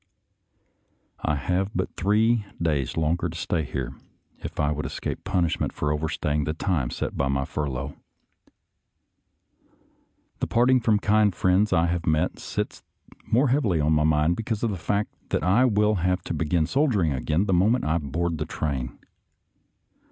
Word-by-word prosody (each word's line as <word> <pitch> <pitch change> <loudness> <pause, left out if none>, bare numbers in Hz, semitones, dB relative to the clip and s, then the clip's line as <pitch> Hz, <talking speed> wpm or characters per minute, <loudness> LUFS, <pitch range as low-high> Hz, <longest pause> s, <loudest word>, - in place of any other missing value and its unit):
I 75 - +1
have 90 +7 0
but 95 - -2
three 110 +3 +2 0.2
days 75 -5 -1
longer 85 +2 +1
to 80 - -7
stay 85 -1 -1
here 65 -3 -4 0.5
if - - -7
I 75 0 +2
would 75 0 -2
escape - - -5
punishment 90 -4 0
for 75 - -1
overstaying 75 -1 -1
the 80 - -2
time 80 -8 0
set - - -4
by 70 - 0
my 70 0 0
furlough. 70 -1 -3 2.5
The - - -1
parting 125 +2 +4
from 110 -2 +2
the 105 - 0
kind 105 -3 +3
friends 95 +4 +2
I 85 -2 +3
have 85 -1 -2
met 80 -1 +1
sits - - -4 0.3
the - - -20
more 130 +4 +4
heav 140 +4 +2
ily 90 -8 +1
on 75 +1 +2
my 75 0 +3
mind 75 +2 +2
because 110 -1 -3
of 115 - +1
the - - -2
fact 100 +5 -1 0.2
that - - 0
I 105 +8 +4
will 105 -2 +3
have 90 0 0
to - - -4
begin 80 +1 +1
soldiering 105 - +1
again 75 +8 0
the 95 - +1
moment 105 +8 +3
I 80 +2 +1
board 80 +3 -2
the - - -1
train. 65 -5 -3
85 Hz, 170 wpm, -25 LUFS, 75-105 Hz, 2.5 s, parting